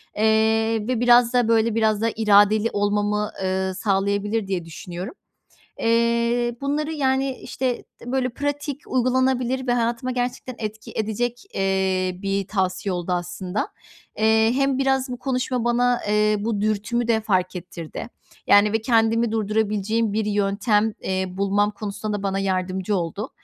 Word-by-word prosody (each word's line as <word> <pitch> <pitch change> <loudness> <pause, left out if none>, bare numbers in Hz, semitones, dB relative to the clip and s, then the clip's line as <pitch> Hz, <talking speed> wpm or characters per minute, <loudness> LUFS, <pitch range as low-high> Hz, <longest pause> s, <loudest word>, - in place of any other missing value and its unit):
eee, 220 0 +2
ve 250 -3 0
biraz 245 0 +5
da, 245 -2 +3
böyle, 225 -1 +2
biraz 220 -2 +2
da 230 - +2
iradeli 210 +1 +4
olmamı, 205 +1 0
eee, 190 0 -1
sağlayabilir 200 +2 0
diye 180 -3 -2
düşünüyorum. 175 - -7 0.7
Eee, 235 +1 +1
bunları, 300 +3 -1
yani, 265 -2 0
işte, 255 -2 -3 0.2
d 245 +2 -7
böyle, 260 -1 +1
pratik, 285 +2 -3
uygulanabilir 260 0 +1
ve 245 - +2
hayatıma 240 +1 0
gerçekten 250 0 -3
etki 215 -1 -6
edecek, 230 +3 -2
eee, 190 -1 0
bir 195 -1 -1
tavsiye 190 0 -1
oldu 180 0 -2
aslında. 180 +2 -3 0.5
Eee, 220 +1 +4
hem 275 0 +1
biraz 270 -1 +1
bu 245 - -5
konuşma 255 -2 -1
bana, 245 +1 +2
eee, 210 0 +3
bu 210 0 -2
dürtümü 215 +3 -1
de 220 -1 +3
fark 185 -3 0
ettirdi. 175 +1 -7 0.4
Yani, 205 +1 +5
ve 225 - +1
kendimi 225 0 +2
durdurabileceğim 215 0 0
bir 220 0 0
yöntem, 205 +1 +1
eee, 190 0 -1
bulmam 200 +2 +1
konusunda 210 0 -4
da 195 - -8
bana 195 -1 -1
yardımcı 190 +1 -1
oldu. 180 +5 -3
220 Hz, 145 wpm, -23 LUFS, 200-240 Hz, 0.7 s, biraz